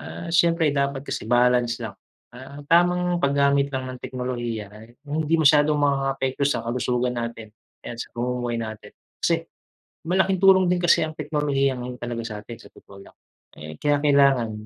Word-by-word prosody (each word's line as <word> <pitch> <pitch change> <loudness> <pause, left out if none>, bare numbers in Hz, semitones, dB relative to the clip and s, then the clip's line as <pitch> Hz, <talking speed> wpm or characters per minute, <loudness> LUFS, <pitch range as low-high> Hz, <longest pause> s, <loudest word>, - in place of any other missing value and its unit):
ah, 170 - -8
siyempre 165 -2 +3
dapat 140 -1 -1
kasi 110 - -5
balance 120 -1 +3
lang, 110 - -5 0.4
ah, 140 +3 -11
tamang 175 +2 +2
paggamit 140 0 +2
lang 130 -2 -4
ng 125 - -10
teknolohiya 120 -5 -5
ay 110 +3 -15
yung 150 +2 -3
hindi 165 - +3
masyadong 150 -1 +4
makakaapekto 135 -1 0
sa 145 - -2
kalusugan 125 +1 -1
natin, 115 -2 -6
o 110 - -67
kaya - - -6
sa - - -6
pamumuhay 120 0 -2
natin. 110 -2 -7 0.3
Kasi, 165 -1 0 0.6
malaking 190 +2 +1
tulong 190 -1 +6
din 180 0 0
kasi 175 - +5
ang 155 - -9
teknolohiya 145 -3 -1
ngayon 125 0 -6
talaga 120 -1 -4
sa'tin 105 +1 -8
sa - - -14
totoo 100 - -15
lang. - - -19 0.4
Eh, 75 0 -10
kinakailangan 140 -5 +3
135 Hz, 165 wpm, -23 LUFS, 120-150 Hz, 0.6 s, tulong